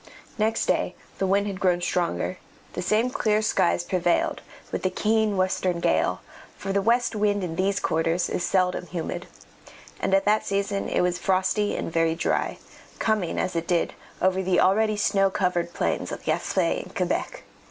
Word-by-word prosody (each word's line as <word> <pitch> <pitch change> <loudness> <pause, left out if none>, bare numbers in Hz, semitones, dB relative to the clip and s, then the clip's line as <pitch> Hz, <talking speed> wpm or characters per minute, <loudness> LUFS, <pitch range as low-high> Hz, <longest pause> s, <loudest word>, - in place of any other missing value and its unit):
Next 220 +1 +1
day - - 0 0.2
the 195 - +1
wind 200 +2 +2
had 195 -2 -4
grown 180 -3 +2
stronger; 175 +1 -1 0.3
the - - -3
same 215 +7 +1
clear 215 -3 +1
skies 175 -4 +2
prevailed, 175 -1 0 0.3
with - - -2
the 185 - +1
keen 215 +1 +1
western 185 -1 0
gale, - - +1 0.4
for 195 0 -3
the 200 - +2
west 235 +2 +2
wind 205 -1 +1
in 165 -2 -3
these 195 +3 +1
quarters 165 +2 0
is 180 - -2
seldom 180 -1 +1
humid, 170 -2 -4 0.7
and 195 - +2
at 195 +1 +2
that 210 +1 +3
season 200 0 -1
it - - +1
was 180 0 0
frosty 190 +3 +1
and 165 - -4
very 165 -1 +2
dry, - - -1 0.4
coming 210 -6 0
as 180 - -1
it 165 0 -2
did 175 -2 +1 0.3
over 185 0 +3
the 185 -1 +2
already 215 +3 +3
snow 195 -1 +3
covered 180 -3 0
plains - - -1
of - - -6
Gaspé - - 0
and - - -13
Quebec. - - -2
190 Hz, 175 wpm, -25 LUFS, 180-205 Hz, 0.7 s, that